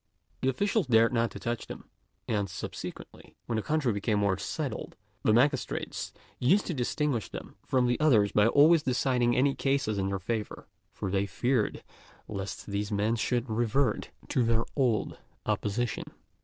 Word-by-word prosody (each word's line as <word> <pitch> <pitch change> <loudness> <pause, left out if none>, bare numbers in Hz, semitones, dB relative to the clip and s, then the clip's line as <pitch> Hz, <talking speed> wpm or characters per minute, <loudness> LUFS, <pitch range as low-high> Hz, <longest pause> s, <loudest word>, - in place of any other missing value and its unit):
The 130 - +2
officials 200 - +1
dared 115 0 +4
not 115 -1 +2
touch 120 -1 -4
them; - - -9 0.4
and 105 -3 0
subsequently, - - -8
when 115 - -1
the - - 0
country 150 -3 +1
became 105 +1 0
more 100 -2 +2
settled, - - -4 0.3
the - - +3
magistrates 130 +4 +1 0.3
used 185 +12 +3
to 175 - -2
distinguish 135 -2 -1
them - - -8
from 130 -1 +2
the 120 0 +1
others 115 -10 +4
by 105 +1 +4
always 150 +6 +6
deciding 125 -3 +1
any 135 +2 +3
cases 135 -8 0
in 95 - 0
their 100 0 -1
favour: 105 +3 -4 0.2
for 95 - -4
they 100 +1 +1
feared 120 0 0 0.4
lest 100 -1 -5
these 100 +1 -3
men 105 +3 +1
should 120 +2 0
revert 115 +1 +1 0.2
to 130 - +2
their 115 -1 +2
old 120 -7 +1 0.3
opposition. 115 +3 -1
120 Hz, 155 wpm, -29 LUFS, 105-135 Hz, 0.4 s, always